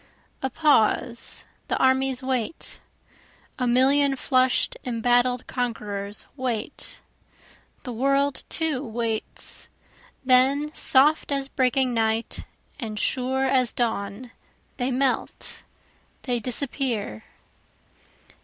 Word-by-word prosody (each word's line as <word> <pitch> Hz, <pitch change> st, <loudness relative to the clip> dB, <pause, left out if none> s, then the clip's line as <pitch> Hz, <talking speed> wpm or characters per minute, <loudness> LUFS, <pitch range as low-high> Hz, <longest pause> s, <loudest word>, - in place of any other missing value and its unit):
A 265 Hz, -, -1 dB
pause 240 Hz, -4 st, +1 dB, 0.2 s
the -, -, 0 dB
armies 260 Hz, 0 st, +2 dB
wait, 260 Hz, +3 st, -2 dB, 0.8 s
A 250 Hz, -, +1 dB
million 270 Hz, +3 st, +4 dB
flush'd 255 Hz, -1 st, +2 dB
embattled 245 Hz, +1 st, +1 dB
conquerors 210 Hz, -5 st, -3 dB
wait, 245 Hz, -5 st, -4 dB, 0.9 s
The 250 Hz, -, -5 dB
world 275 Hz, +3 st, +1 dB
too 310 Hz, -5 st, -1 dB
waits, 230 Hz, -2 st, -3 dB, 0.6 s
then 270 Hz, +4 st, +4 dB
soft 295 Hz, +3 st, +4 dB
as 275 Hz, -1 st, -1 dB
breaking 255 Hz, -1 st, +1 dB
night 225 Hz, 0 st, -1 dB, 0.3 s
and 215 Hz, -2 st, -4 dB
sure 265 Hz, +3 st, 0 dB
as 260 Hz, -2 st, +2 dB
dawn, 225 Hz, 0 st, -2 dB, 0.5 s
They 250 Hz, 0 st, -1 dB
melt, 265 Hz, 0 st, -1 dB, 0.6 s
they 245 Hz, -3 st, -1 dB
disappear. 240 Hz, -, -2 dB
255 Hz, 90 wpm, -25 LUFS, 235-270 Hz, 0.9 s, million